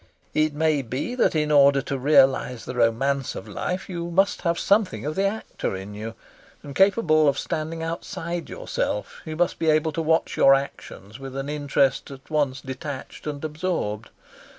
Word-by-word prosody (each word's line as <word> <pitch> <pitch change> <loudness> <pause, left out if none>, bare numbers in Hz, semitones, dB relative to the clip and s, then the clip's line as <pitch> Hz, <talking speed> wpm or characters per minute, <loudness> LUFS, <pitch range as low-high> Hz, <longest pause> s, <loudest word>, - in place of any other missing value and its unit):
It 155 -1 +1
may 155 -1 +2
be 130 - -4
that 250 - +2
in 150 -1 +1
order 140 -1 +6
to 140 - -3
realise 135 -3 +3
the - - -5
romance 125 +3 +1
of - - -7
life 180 +1 -3
you 170 -2 -4
must 195 +3 +2
have 170 -1 0
something 200 -4 +1
of 150 - -1
the 195 +4 +1
actor 210 - -4
in 95 +2 -7
you; 110 +2 -6 0.5
and, 140 - -8
capable 170 -5 +4
of 140 -1 +2
standing 160 +1 -3
outside 170 +1 -4
yourself, 105 - -3
you 155 - -5
must 175 +2 0
be 160 - +2
able 155 +1 +3
to 165 - -2
watch 160 +1 +1
your 135 0 +7
actions 115 -5 -6
with 135 -1 -8
an 135 +1 -3
interest 140 -2 +1
at 135 +2 -12
once 140 -4 0
detached 135 +2 -7
and 145 0 -4
absorbed. 150 - -3
150 Hz, 175 wpm, -24 LUFS, 135-165 Hz, 0.5 s, your